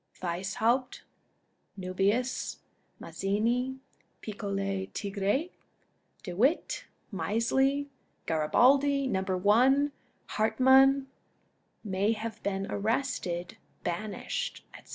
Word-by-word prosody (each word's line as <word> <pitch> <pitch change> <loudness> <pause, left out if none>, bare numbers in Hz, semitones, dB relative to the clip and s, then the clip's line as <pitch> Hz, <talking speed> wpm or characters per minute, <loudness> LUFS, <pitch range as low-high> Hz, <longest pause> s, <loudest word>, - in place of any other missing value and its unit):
Weishaupt, 220 +9 -1 0.8
Nuhius^ 195 +7 0 0.4
Mazzini, 235 +7 -1 0.4
Piccolo 195 -2 -3
Tigre, 205 - -1 0.7
De 180 - -5
Witt, 265 - +1 0.3
Misley, 265 +8 +1 0.4
Garibaldi, 270 - +3
Number 190 -6 0
One, 255 +9 +4 0.3
Hartmann, 265 +5 +4 0.8
may 200 +1 +1
have 220 0 -6
been 195 -1 -2
arrested, 205 -6 -2 0.3
banished, 215 - -3
etc. - - -14
220 Hz, 70 wpm, -29 LUFS, 195-265 Hz, 0.8 s, One